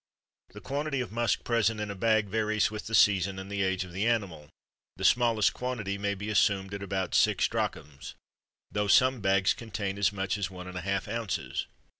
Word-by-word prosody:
The - - -10
quantity 140 0 -2
of 125 - -4
musk 115 +1 0
present 115 -2 +1
in 105 -1 -3
a - - -6
bag 110 +1 +2
varies 110 0 0
with 105 0 -6
the 115 - -1
season 95 -2 +4
and 95 +1 -8
the 100 0 -1
age 95 -1 0
of 90 - -11
the 95 +6 -1
animal; 95 -11 -1 0.5
the - - -4
smallest 115 -4 +3
quantity 110 -6 -3
may 100 0 -1
be 105 +2 -5
assumed 100 -1 +2
at 100 - -5
about 95 -2 -3
six - - +3
drachms, 75 -1 -4 0.6
though 105 0 -1
some 130 +2 +4
bags 95 -1 +3
contain 100 -3 -5
as 100 - +3
much 95 0 -2
as 100 - -2
one 90 -1 -9
and 90 - -8
a - - -6
half 95 +2 -2
ounces. 115 -2 -3
100 Hz, 200 wpm, -29 LUFS, 95-110 Hz, 0.6 s, season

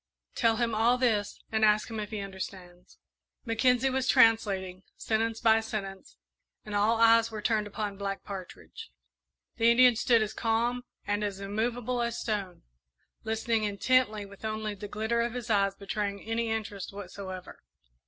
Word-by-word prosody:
Tell 230 -2 +2
him 235 0 0
all 230 +3 +3
this 220 -5 0
and 220 0 +1
ask 210 0 +4
him 225 -1 -5
if 210 -1 -4
he 215 -2 -4
understands." 185 -2 -9 0.5
Mackenzie 250 +3 +2
was 265 0 -1
translating, 195 -6 +3 0.2
sentence 225 0 -1
by 225 -1 +5
sentence, 195 - -6 0.5
and 210 - -7
all 215 +3 +2
eyes 230 0 +5
were 220 -1 -6
turned 210 0 0
upon 205 -1 -4
Black 195 -1 -4
Partridge. 190 - -9 0.7
The 230 +1 +4
Indian 245 0 +6
stood 230 0 +3
as 215 0 -4
calm 235 +2 0 0.2
and 205 +1 -1
as 200 -2 -3
immovable 235 +4 -2
as 235 0 -2
stone, 200 -5 -3 0.6
listening 225 0 0
intently, 215 +1 +1
with 200 +1 -15
only 215 -1 -3
the 205 +1 -8
glitter 220 +3 -1
of 235 +1 -2
his 240 -2 -4
eyes 200 -1 +2
betraying 200 0 -4
any 225 +1 -1
interest 210 -3 -4
whatsoever. 190 -1 -8
220 Hz, 155 wpm, -29 LUFS, 200-230 Hz, 0.7 s, Indian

